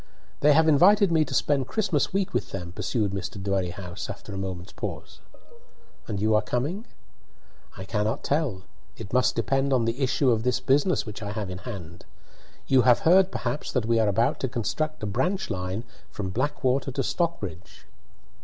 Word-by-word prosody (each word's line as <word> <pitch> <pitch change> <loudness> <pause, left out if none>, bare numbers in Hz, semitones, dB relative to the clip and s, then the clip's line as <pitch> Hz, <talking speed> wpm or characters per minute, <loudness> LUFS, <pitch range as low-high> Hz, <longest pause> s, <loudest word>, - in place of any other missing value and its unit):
"They 150 +1 +5
have 160 +2 +4
invited 190 +6 +5
me 160 -1 +4
to - - -7
spend 140 -3 +1
Christmas 185 -7 0
week 195 0 -1
with - - -1
them," 90 -3 -6
pursued 105 +2 -1
Mr. 100 0 -5
Dwerrihouse, 95 -2 -3
after 100 +1 -8
a - - -5
moment's 95 -2 -5
pause. - - -6 0.9
"And 105 -3 -3
you 110 +2 +2
are 105 - +4
coming?" 145 - -2 0.9
"I 95 - -6
cannot 110 +4 -1
tell. 140 -11 -1 0.3
It 110 -1 -9
must 125 0 +3
depend 135 +5 +1
on 125 -3 +3
the 115 +4 -2
issue 130 0 +2
of 110 -2 +1
this 125 +1 +1
business 140 +8 +2
which 105 -1 -8
I 100 -1 -4
have 105 -3 -4
in 90 - -6
hand. 85 -6 -8 0.6
You 130 -1 +4
have 125 -1 +4
heard 185 +3 +5
perhaps 150 - -3
that 125 -4 0
we 115 0 +2
are 110 - +3
about 115 +4 +1
to 130 - -1
construct 145 +5 -2
a - - 0
branch 130 - -1
line 90 +4 -3 0.3
from 95 -3 -5
Blackwater 130 +2 0
to 135 - -1
Stockbridge." 100 - -3
120 Hz, 180 wpm, -26 LUFS, 100-145 Hz, 0.9 s, They